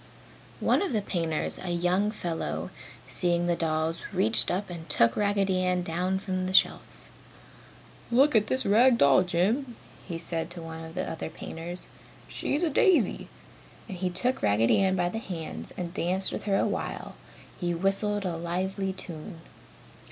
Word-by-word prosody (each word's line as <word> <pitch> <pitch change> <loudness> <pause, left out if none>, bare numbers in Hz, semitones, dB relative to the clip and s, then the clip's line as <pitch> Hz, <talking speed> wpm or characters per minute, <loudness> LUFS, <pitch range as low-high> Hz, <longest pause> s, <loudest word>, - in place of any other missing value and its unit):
One - - +3
of 390 -9 -1
the 210 -2 0
painters, 165 -5 -2
a 185 - -5
young 180 +4 +1
fellow, 175 -6 -4 0.4
seeing 175 -1 +1
the 175 0 +2
dolls, 160 0 -1
reached 200 +5 +2
up 185 +1 -2
and 165 -1 -8
took 115 0 +3
Raggedy 200 -2 +1
Ann 180 -1 +1
down 180 +3 -1
from 185 -1 -2
the 185 - -1
shelf. - - +5 1.3
"Look 270 +3 +4
at 215 -1 +4
this 260 +2 +1
rag 235 +4 +5
doll, 140 -6 +6
Jim," 215 +9 0 0.3
he 170 -3 -4
said 165 0 -2
to 175 -1 -6
one 165 0 -7
of 160 +1 -10
the 185 - -2
other 160 - -4
painters, 165 +2 -5 0.4
"She's 295 +5 -1
a 335 - +3
daisy," 370 +4 +3 0.6
and 195 - -6
he 185 +1 -1
took 245 +9 0
Raggedy 105 +2 +3
Ann 190 -1 +2
by 175 -1 +1
the 225 - -4
hands 160 - -6
and 175 -1 -4
danced 190 +1 0
with - - -5
her 195 -2 +2
while - - -3 0.5
he 175 -2 -1
whistled 195 +3 0
a 170 -2 -2
lively 190 +3 -2
tune. 170 -1 -8
180 Hz, 165 wpm, -28 LUFS, 170-200 Hz, 1.3 s, doll